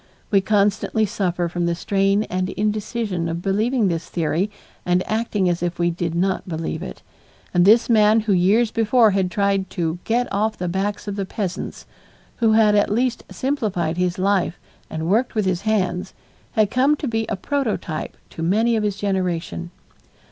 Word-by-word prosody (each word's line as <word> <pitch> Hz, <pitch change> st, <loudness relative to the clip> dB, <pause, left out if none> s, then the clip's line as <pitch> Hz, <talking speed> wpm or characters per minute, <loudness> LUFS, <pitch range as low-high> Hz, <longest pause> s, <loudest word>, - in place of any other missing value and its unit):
We 200 Hz, -2 st, +4 dB
constantly 210 Hz, +2 st, +1 dB
suffer 180 Hz, -4 st, -1 dB
from 175 Hz, 0 st, -2 dB
the 170 Hz, -, 0 dB
strain 195 Hz, +3 st, +1 dB
and 185 Hz, -2 st, -2 dB
indecision 210 Hz, -4 st, -2 dB
of 170 Hz, +1 st, -4 dB
believing 215 Hz, +4 st, +1 dB
this 165 Hz, -2 st, -2 dB
theory 170 Hz, +4 st, 0 dB, 0.3 s
and 180 Hz, +1 st, +1 dB
acting 215 Hz, -3 st, 0 dB
as 175 Hz, -1 st, 0 dB
if 175 Hz, 0 st, -2 dB
we 175 Hz, 0 st, +1 dB
did 170 Hz, -1 st, -3 dB
not 185 Hz, +1 st, 0 dB
believe 160 Hz, -1 st, -3 dB
it, 65 Hz, -, -8 dB, 0.5 s
and 175 Hz, 0 st, +4 dB
this 225 Hz, +4 st, +6 dB
man 220 Hz, -1 st, +5 dB
who 210 Hz, -2 st, +1 dB
years 205 Hz, +6 st, +3 dB
before 225 Hz, 0 st, +4 dB
had 190 Hz, -2 st, +1 dB
tried 200 Hz, -1 st, 0 dB
"to 170 Hz, -2 st, -2 dB
get 240 Hz, +2 st, +1 dB
off 215 Hz, +2 st, 0 dB
the 180 Hz, -, -3 dB
backs 195 Hz, +4 st, -2 dB
of 200 Hz, 0 st, -4 dB
the 195 Hz, -, -1 dB
peasants," 190 Hz, -4 st, -4 dB, 0.5 s
who 225 Hz, -2 st, +3 dB
had 220 Hz, -1 st, +5 dB
at 205 Hz, -1 st, +3 dB
least 240 Hz, +3 st, 0 dB
simplified 200 Hz, -, -1 dB
his 180 Hz, -1 st, 0 dB
life 190 Hz, -2 st, +1 dB, 0.3 s
and 160 Hz, 0 st, -4 dB
worked 230 Hz, +8 st, +1 dB
with 215 Hz, -2 st, +1 dB
his 185 Hz, -1 st, 0 dB
hands, 185 Hz, -5 st, -1 dB, 0.4 s
had 215 Hz, -3 st, +2 dB
come 270 Hz, +4 st, +3 dB
to 295 Hz, -, -4 dB
be 225 Hz, -2 st, -1 dB
a -, -, 0 dB
prototype 215 Hz, -, -3 dB
to -, -, -8 dB
many 220 Hz, +8 st, +2 dB
of 220 Hz, -, +1 dB
his 205 Hz, -2 st, -1 dB
generation. 180 Hz, -, -2 dB
195 Hz, 175 wpm, -22 LUFS, 175-220 Hz, 0.5 s, this